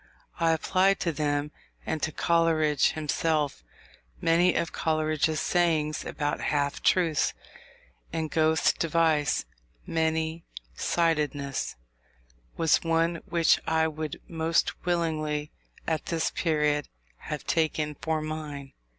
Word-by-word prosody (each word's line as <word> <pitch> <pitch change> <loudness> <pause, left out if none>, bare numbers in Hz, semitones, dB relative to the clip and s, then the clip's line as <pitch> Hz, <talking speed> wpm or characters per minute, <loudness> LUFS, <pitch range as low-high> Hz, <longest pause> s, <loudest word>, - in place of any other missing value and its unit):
I 165 - +3
applied 185 +4 +2
to 170 - +1
them, 145 -1 -1 0.3
and 155 - -2
to 160 - -1
Coleridge 160 -3 +2
himself, 150 - -1 0.6
many 170 +2 +3
of 170 - 0
Coleridge's 155 0 0
sayings 160 -3 +1
about 145 0 -2
half 140 -1 0
truths; 165 -5 +2 0.8
and 160 -1 -3
Goethe's 160 -2 +3
device, 160 - +1 0.4
"many 160 0 -1 0.3
sidedness," 150 - 0 0.8
was 165 -1 +3
one 165 0 +1
which 170 -1 +3
I 160 0 +2
would 155 -1 -5
most 165 +1 -1
willingly, 155 -3 -1 0.3
at 160 -2 -2
this 165 -1 0
period, 150 -3 0 0.3
have 150 - -6
taken 155 -2 0
for 155 +1 -2
mine. 150 -3 -6
160 Hz, 105 wpm, -27 LUFS, 150-165 Hz, 0.8 s, I